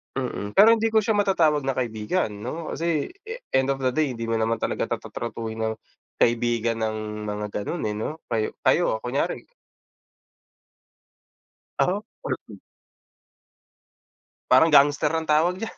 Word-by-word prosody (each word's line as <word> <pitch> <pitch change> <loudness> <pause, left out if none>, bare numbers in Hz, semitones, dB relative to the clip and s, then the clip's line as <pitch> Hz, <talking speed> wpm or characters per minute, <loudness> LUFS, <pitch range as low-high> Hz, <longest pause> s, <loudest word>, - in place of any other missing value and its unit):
Mm. 120 -6 -3
Pero 210 +3 +7
hindi 225 0 +1
ko 220 - +5
siya 215 0 +1
matatawag 165 -8 +2
na 135 - +1
kaibigan, 115 +5 -1
'no. 125 +11 -6
Kasi 165 -2 -1 0.2
e 445 - -5 0.2
end 130 +1 +2
of 135 - -8
the 130 - +2
day, 140 +1 0
hindi 115 -1 -5
mo 115 - +1
naman 115 +1 0
talaga - - -1
ta - - -4
ta-tratuhin 110 -1 -5
ng 110 0 -1 0.5
kaibigan 120 -1 +2
ng 110 -1 -3
mga 105 0 -3 0.2
ganun, 175 - -3
eh, 105 - -3
'no. 155 +9 -4
Kayo 110 -2 -1
kayo 110 - +2
kunyari 125 +3 -2 2.3
Ako, 200 +4 +1 0.2
part - - -2
din. - - -12 1.9
Parang 165 - +7
gangster 145 +1 +5
ang 160 0 -1
tawag 160 +4 +3
diyan, 225 - -6
130 Hz, 150 wpm, -24 LUFS, 110-160 Hz, 2.3 s, Pero